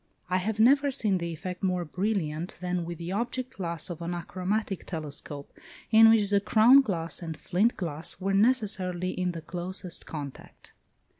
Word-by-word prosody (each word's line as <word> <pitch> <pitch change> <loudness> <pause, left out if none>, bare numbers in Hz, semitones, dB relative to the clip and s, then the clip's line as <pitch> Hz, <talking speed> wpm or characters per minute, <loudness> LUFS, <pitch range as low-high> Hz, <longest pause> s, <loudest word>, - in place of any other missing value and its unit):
I 185 - +3
have 210 +4 -2
never 275 +5 +5
seen 215 -8 +1
the 170 0 -3
effect 180 +3 -6
more 180 -2 0
brilliant 175 -2 -2
than 180 -1 -2
with 170 0 -6
the 170 +2 -5
object 240 +5 -3
glass 170 -4 -4
of 170 - -7
an 170 +1 -3
achromatic 190 +3 -2
telescope, 145 -3 -7 0.4
in 225 0 +8
which 210 -3 +4
the 200 -1 +4
crown 230 +6 +7
glass 170 -10 -2
and 165 -3 -5
flint 205 +10 +1
glass 165 -2 -4
were 195 +1 -1
necessarily 195 -5 +1
in 180 -1 -2
the 165 -2 -7
closest 180 +1 -5
contact. 145 -4 -9
185 Hz, 165 wpm, -28 LUFS, 170-215 Hz, 0.4 s, in